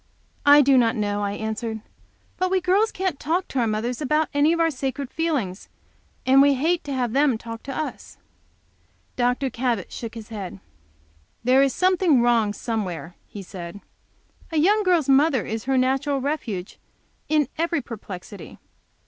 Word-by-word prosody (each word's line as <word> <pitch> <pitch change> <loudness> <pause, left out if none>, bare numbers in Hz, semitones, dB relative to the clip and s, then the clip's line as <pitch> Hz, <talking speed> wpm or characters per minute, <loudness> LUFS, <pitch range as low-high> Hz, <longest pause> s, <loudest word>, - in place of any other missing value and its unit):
"I 290 +1 +9
do 270 -1 +5
not 230 0 +2
know," 205 -2 -1
I 200 0 -1
answered. 220 +1 -4 0.6
"But 370 0 0
we 380 0 +2
girls 380 +5 +2
can't 370 -6 -2
talk 345 +5 -1
to 265 - -2
our 235 - +2
mothers 230 +5 -2
about 305 +2 +1
any 290 +2 +4
of 335 - 0
our 330 -1 +3
sacred 270 0 -4
feelings, 275 - -2 0.6
and 265 +1 +6
we 280 0 +5
hate 325 +6 0
to 285 - -4
have 245 -3 -1
them 275 -4 +3
talk 230 0 -8
to 275 - -6
us." 310 - -6 1.0
Dr. 250 +2 0
Cabot 235 -5 -2
shook 230 -1 -7
his 225 -1 -9
head. 195 - -7 0.8
"There 255 +3 +5
is 275 -1 +3
something 365 -6 +3
wrong 235 -3 +3
somewhere," 185 - -4
he 200 - -9
said, 180 0 -8 0.7
"A 320 - -1
young 405 +8 +4
girl's 355 -7 +2
mother 275 -2 +3
is 220 +2 -4
her 270 0 +1
natural 270 +2 +1
refuge 245 -10 -4 0.5
in 300 -2 +2
every 335 -1 +1
perplexity. 205 -5 -9
260 Hz, 165 wpm, -23 LUFS, 220-305 Hz, 1.0 s, I